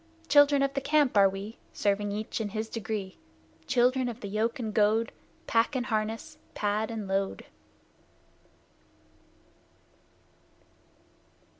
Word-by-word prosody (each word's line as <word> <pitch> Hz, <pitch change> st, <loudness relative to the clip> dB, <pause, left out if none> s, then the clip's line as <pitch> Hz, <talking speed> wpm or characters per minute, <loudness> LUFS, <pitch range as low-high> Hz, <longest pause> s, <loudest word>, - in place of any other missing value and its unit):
Children 285 Hz, -1 st, +6 dB
of 275 Hz, 0 st, 0 dB
the 275 Hz, -, -1 dB
Camp 290 Hz, -3 st, +2 dB
are 200 Hz, -1 st, +6 dB
we, 195 Hz, +4 st, -7 dB
Serving 205 Hz, 0 st, 0 dB
each 215 Hz, +2 st, -3 dB
in 210 Hz, -, -2 dB
his 220 Hz, +2 st, -4 dB
degree; 210 Hz, -4 st, -5 dB, 0.5 s
Children 250 Hz, +1 st, +2 dB
of 240 Hz, +1 st, -8 dB
the 205 Hz, -, -5 dB
yoke 215 Hz, +3 st, -1 dB
and 220 Hz, -4 st, -4 dB
goad, 220 Hz, +1 st, +2 dB, 0.3 s
Pack 230 Hz, +4 st, +2 dB
and 250 Hz, -2 st, -1 dB
harness, 225 Hz, +7 st, -3 dB, 0.2 s
pad 210 Hz, +1 st, 0 dB
and 220 Hz, -3 st, -5 dB
load! 195 Hz, 0 st, -2 dB
220 Hz, 120 wpm, -28 LUFS, 205-250 Hz, 0.5 s, Children